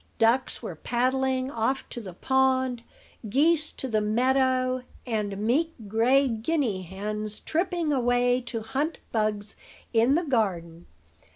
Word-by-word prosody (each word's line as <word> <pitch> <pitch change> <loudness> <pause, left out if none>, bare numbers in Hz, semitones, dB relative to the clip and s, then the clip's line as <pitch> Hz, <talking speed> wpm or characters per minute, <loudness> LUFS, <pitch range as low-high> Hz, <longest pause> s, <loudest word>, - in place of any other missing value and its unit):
Ducks 240 +3 +2
were 205 - -4
paddling 260 - 0
off 250 +3 -1
to 240 - -6
the 190 -5 -8
pond; 260 0 +1 0.5
geese 310 +6 +3
to 265 - -5
the 215 -3 +1
meadow; 255 +3 +2 0.2
and 210 -5 -2
meek 275 +11 +1
gray 245 +6 +3
guinea 230 - -1
hens 210 +3 -3
tripping 340 -2 -1
away 245 -1 +2
to 230 -1 -3
hunt 275 +8 -2
bugs 215 -1 -1 0.4
in 235 +5 +4
the 345 - +1
garden. 175 - -1
245 Hz, 125 wpm, -26 LUFS, 215-265 Hz, 0.5 s, in